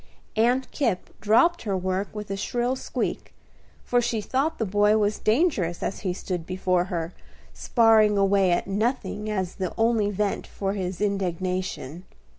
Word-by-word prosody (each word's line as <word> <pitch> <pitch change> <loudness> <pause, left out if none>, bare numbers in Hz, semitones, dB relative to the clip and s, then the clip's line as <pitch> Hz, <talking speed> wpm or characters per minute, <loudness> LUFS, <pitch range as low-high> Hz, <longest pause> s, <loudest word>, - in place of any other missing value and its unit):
Aunt 245 +4 +2
Kipp 230 -10 -1
dropped 285 +12 +4
her 200 -4 -1
work 185 +2 -1
with 210 -2 -7
a - - -1
shrill 240 +5 -1
squeak, - - -4 0.5
for 245 0 +2
she 235 -2 -1
thought 270 +9 -1
the 225 - -1
boy 205 +2 +3
was 210 0 +1
dangerous, 215 - +1
as - - -3
he 190 - -2
stood 180 -1 -4
before 185 0 0
her, 170 -2 -4 0.4
sparring 220 -3 +4
away 195 -1 +3
at 175 - +1
nothing 215 +1 -2
as 190 -4 -2
the 185 -3 -3
only 225 -2 +2
vent 205 0 -2
for 195 -1 -3
his 185 -1 -4
indignation. 185 -4 -2
205 Hz, 155 wpm, -25 LUFS, 185-225 Hz, 0.5 s, dropped